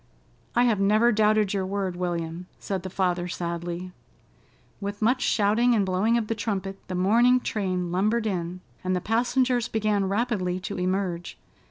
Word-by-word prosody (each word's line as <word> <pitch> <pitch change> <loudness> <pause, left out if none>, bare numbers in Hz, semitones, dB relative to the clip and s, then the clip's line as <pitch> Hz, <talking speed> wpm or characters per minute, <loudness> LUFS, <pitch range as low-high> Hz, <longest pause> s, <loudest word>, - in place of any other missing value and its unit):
"I 240 - +5
have 230 -5 +2
never 215 +4 +4
doubted 215 -2 +3
your 195 -1 0
word, 190 -1 -2
William," 175 -1 -3
said 190 -2 -3
the 190 - -6
father 180 -1 0
sadly. 175 +1 -4 0.9
With 205 0 -5
much 250 +4 +2
shouting 230 +2 +3
and 205 -3 +2
blowing 195 +5 +2
of 230 - -1
the 225 - -1
trumpet, 195 -3 -3
the 185 - -4
morning 235 +7 +4
train 185 -6 -2
lumbered 215 +5 +1
in, 180 -3 -3 0.2
and 185 0 0
the - - +1
passengers 245 +3 +1
began 210 -4 0
rapidly 200 -4 0
to 195 0 -5
emerge. 180 -2 -2
195 Hz, 160 wpm, -26 LUFS, 180-220 Hz, 0.9 s, I